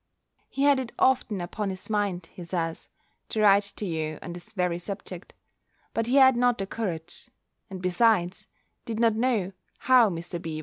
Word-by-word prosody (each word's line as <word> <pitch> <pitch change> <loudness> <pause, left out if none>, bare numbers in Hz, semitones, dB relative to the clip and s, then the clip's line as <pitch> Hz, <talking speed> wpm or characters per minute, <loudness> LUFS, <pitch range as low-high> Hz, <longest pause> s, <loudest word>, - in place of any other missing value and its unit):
He 275 - -2
had 285 -2 +5
it 255 -3 -5
often 250 -6 +2
upon 200 +4 -3
his 190 -1 -6
mind, 200 -5 -1
he 180 - -9
says, 165 -1 -4 0.4
to 220 - -2
write 200 -1 +5
to 210 - -4
you 155 -3 -3
on 175 - -6
this 175 +5 -9
very 180 -4 -1
subject; 195 -1 -7 0.6
but 230 0 -1
he 250 - +1
had 265 -2 +7
not 245 0 +2
the 195 - -3
courage; 175 -6 -5 0.4
and 185 -1 -8
besides, 180 -1 +2 0.4
did 225 -1 -4
not 230 -1 +4
know 220 -5 0 0.3
how 250 -4 +5
Mr. 170 -1 -5
B. 160 -2 -5
195 Hz, 175 wpm, -26 LUFS, 175-230 Hz, 0.6 s, had